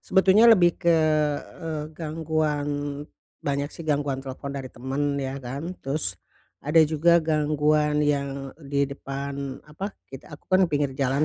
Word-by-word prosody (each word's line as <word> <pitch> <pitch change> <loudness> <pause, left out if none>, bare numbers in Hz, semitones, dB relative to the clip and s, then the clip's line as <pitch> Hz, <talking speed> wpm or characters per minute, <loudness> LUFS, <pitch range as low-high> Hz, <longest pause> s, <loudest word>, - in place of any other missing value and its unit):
Sebetulnya 195 +4 +5
lebih 180 -7 +5
ke, 170 -1 +4 0.6
eee, 160 -3 -3
gangguan, 155 -2 -1 0.8
banyak 140 0 -1
sih 165 - -9
gangguan 145 -3 0
telepon 135 +1 -6
dari 135 -2 -5
teman, 140 +3 -2
ya 135 0 -3
kan. 140 +8 -5
Terus, 135 - -2 0.4
ada 150 +3 -2
juga 160 +3 +4
gangguan 150 -1 +2
yang 140 -2 -1
di 140 -1 0
depan, 140 0 -5
apa, 190 +7 -6 0.2
kita 135 +3 -11
aku - - -35
kan 185 0 +4
pinggir 145 -2 0
jalan 135 +2 +1
145 Hz, 140 wpm, -25 LUFS, 140-155 Hz, 0.8 s, Sebetulnya